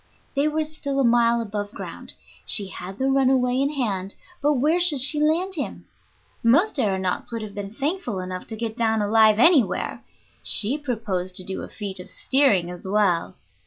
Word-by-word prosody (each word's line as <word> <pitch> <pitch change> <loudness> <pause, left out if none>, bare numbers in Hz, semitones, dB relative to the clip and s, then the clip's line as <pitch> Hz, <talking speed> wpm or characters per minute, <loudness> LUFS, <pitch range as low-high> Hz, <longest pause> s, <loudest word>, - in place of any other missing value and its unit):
They 280 +2 +2
were 310 +1 0
still 290 -3 -4
a - - +3
mile 235 -1 +3
above 205 -2 -5
ground. - - -8 0.3
She 200 -3 +3
had 190 +1 -8
the 265 - -1
runaway 260 -1 +2
in 280 +2 0
hand, 200 -8 -2 0.3
but 295 +1 +3
where 300 +6 +2
should 345 -6 +1
she 280 +4 +3
land 335 +5 +1
him? 300 -6 -5 0.6
Most 295 - +3
aëronauts 190 -1 -1
would 230 -1 -4
have 210 -2 -8
been 200 -1 -6
thankful 275 - -3
enough 185 0 -6
to 225 - -6
get 220 0 -4
down 225 -2 +1
alive 215 0 +4
anywhere; 265 - +3 0.4
she 225 +6 +2
proposed 210 -9 -3
to 185 - +1
do 190 +1 -4
a - - -6
feat 200 -3 -5
of 180 - -9
steering 215 -11 +2
as 180 +1 -9
well. 190 -4 +1
230 Hz, 180 wpm, -23 LUFS, 200-280 Hz, 0.6 s, alive